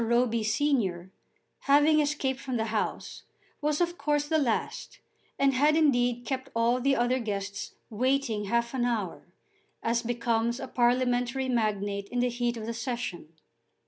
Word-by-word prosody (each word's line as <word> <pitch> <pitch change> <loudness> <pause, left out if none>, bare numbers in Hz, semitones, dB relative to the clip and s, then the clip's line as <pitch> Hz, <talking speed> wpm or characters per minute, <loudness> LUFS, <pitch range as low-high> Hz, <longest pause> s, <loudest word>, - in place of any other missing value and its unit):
Roby 235 -1 +2
senior, 215 -7 0 0.5
having 295 +2 +5
escaped 285 -3 0
from 260 -3 -3
the 220 - 0
House, 215 - -3 0.4
was 295 0 0
of 345 0 0
course 295 0 0
the 315 0 +2
last, 240 -7 -2 0.4
and 275 0 +3
had 295 +4 +4
indeed 245 -6 +2
kept 265 -1 -3
all 235 +2 +2
the 275 +1 +3
other 245 +1 +1
guests 200 -3 -4 0.2
waiting 240 -2 0
half 235 +4 0
an 255 -2 0
hour, 220 -9 -2 0.6
as 235 +1 +1
becomes 235 0 0
a 265 - -5
parliamentary 245 +1 +1
magnate 205 -4 -1
in 245 - -4
the 250 0 +2
heat 240 0 -1
of 220 - -5
the 230 - -3
Session. 235 - -4
245 Hz, 150 wpm, -28 LUFS, 230-270 Hz, 0.6 s, having